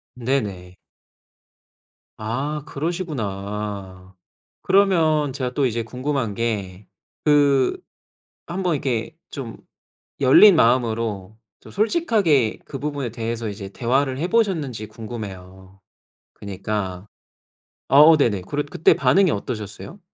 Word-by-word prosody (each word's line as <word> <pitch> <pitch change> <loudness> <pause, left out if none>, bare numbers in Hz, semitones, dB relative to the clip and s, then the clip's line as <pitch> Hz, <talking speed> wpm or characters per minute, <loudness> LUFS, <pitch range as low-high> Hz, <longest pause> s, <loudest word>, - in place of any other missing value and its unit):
네네. 105 -8 -3 1.4
아 135 +7 -3
그러시구나. 105 - -5 0.5
그러면 160 -8 +3
제가 125 -2 -3
또 140 0 +1
이제 115 -1 -1
궁금한 125 -2 -3
게 100 -4 -3 0.4
그 140 -3 +3 0.7
한번 180 -1 -1
이렇게 130 0 -2
좀 125 -6 -7 0.7
열린 175 +9 +8
마음으로 115 -6 +1 0.2
좀 - - -15
솔직하게 210 - +2
그 135 - -8
부분에 145 -4 -3
대해서 115 0 -4
이제 100 -1 -7
대화를 130 +4 0
해보셨는지 160 - 0
궁금해요. 95 -4 -9 0.5
그니까 100 -2 -5 0.8
아 140 - +4
어 160 +1 +8
네네. 110 -10 +1
그래 145 0 -1
그때 145 - +3
반응이 140 +8 +3
어떠셨어요? 105 - -6
125 Hz, 230 characters per minute, -22 LUFS, 105-150 Hz, 1.4 s, 열린